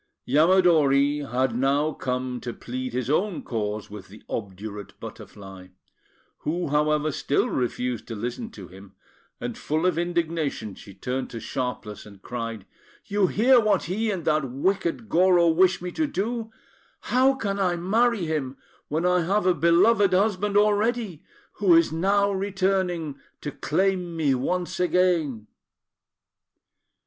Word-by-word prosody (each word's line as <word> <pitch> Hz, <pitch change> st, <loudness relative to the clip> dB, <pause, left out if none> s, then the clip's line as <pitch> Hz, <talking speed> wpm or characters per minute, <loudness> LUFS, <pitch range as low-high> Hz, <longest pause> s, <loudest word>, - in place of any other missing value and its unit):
Yamadori 150 Hz, -2 st, +4 dB
had 125 Hz, -1 st, +1 dB
now 140 Hz, +4 st, +1 dB
come 125 Hz, -1 st, -3 dB
to 120 Hz, -, -5 dB
plead 130 Hz, +1 st, -5 dB
his 125 Hz, -1 st, -2 dB
own 180 Hz, +5 st, 0 dB
cause 105 Hz, -2 st, -3 dB
with 105 Hz, -3 st, -9 dB
the 105 Hz, +3 st, -15 dB
obdurate 100 Hz, 0 st, -6 dB
Butterfly, 95 Hz, -2 st, -10 dB, 0.7 s
who, 170 Hz, +1 st, -2 dB
however, 150 Hz, +1 st, +1 dB
still 140 Hz, -, 0 dB
refused 125 Hz, -1 st, -2 dB
to 115 Hz, -, -5 dB
listen 120 Hz, -, -4 dB
to -, -, -10 dB
him; 95 Hz, +2 st, -15 dB, 0.4 s
and, -, -, -4 dB
full 155 Hz, +3 st, -2 dB
of 180 Hz, -3 st, +2 dB
indignation, 165 Hz, -, -2 dB
she 100 Hz, 0 st, -13 dB
turned 125 Hz, +6 st, -3 dB
to 115 Hz, -, -7 dB
Sharpless, 110 Hz, -4 st, -5 dB
and 100 Hz, -2 st, -14 dB
cried 115 Hz, -2 st, -6 dB, 0.4 s
"You 200 Hz, -1 st, +1 dB
hear 245 Hz, +7 st, +5 dB
what 210 Hz, -4 st, +2 dB
he 215 Hz, +6 st, -1 dB
and 185 Hz, -6 st, -3 dB
that 155 Hz, -4 st, +1 dB
wicked 185 Hz, -, -1 dB
Goro 175 Hz, -2 st, +4 dB
wish 180 Hz, +2 st, +3 dB
me 180 Hz, -, -4 dB
to 310 Hz, -, -1 dB
do! 225 Hz, +1 st, -3 dB, 0.5 s
How 260 Hz, +2 st, +3 dB
can 200 Hz, -5 st, -3 dB
I 180 Hz, -2 st, +1 dB
marry 215 Hz, +3 st, +1 dB
him, 145 Hz, -4 st, -3 dB, 0.3 s
when 160 Hz, +3 st, -1 dB
I 180 Hz, 0 st, +3 dB
have 195 Hz, +4 st, 0 dB
a 185 Hz, -, +4 dB
beloved 180 Hz, +6 st, +4 dB
husband 205 Hz, +1 st, +2 dB
already, 210 Hz, -3 st, +1 dB, 0.4 s
who 190 Hz, -5 st, +5 dB
is 165 Hz, -1 st, +4 dB
now 200 Hz, +5 st, +2 dB
returning 190 Hz, -5 st, -1 dB, 0.2 s
to 145 Hz, -, -4 dB
claim 175 Hz, +4 st, -1 dB
me 150 Hz, -4 st, +2 dB
once 180 Hz, +8 st, -2 dB
again?" 175 Hz, -, +1 dB
165 Hz, 140 wpm, -25 LUFS, 130-190 Hz, 0.7 s, hear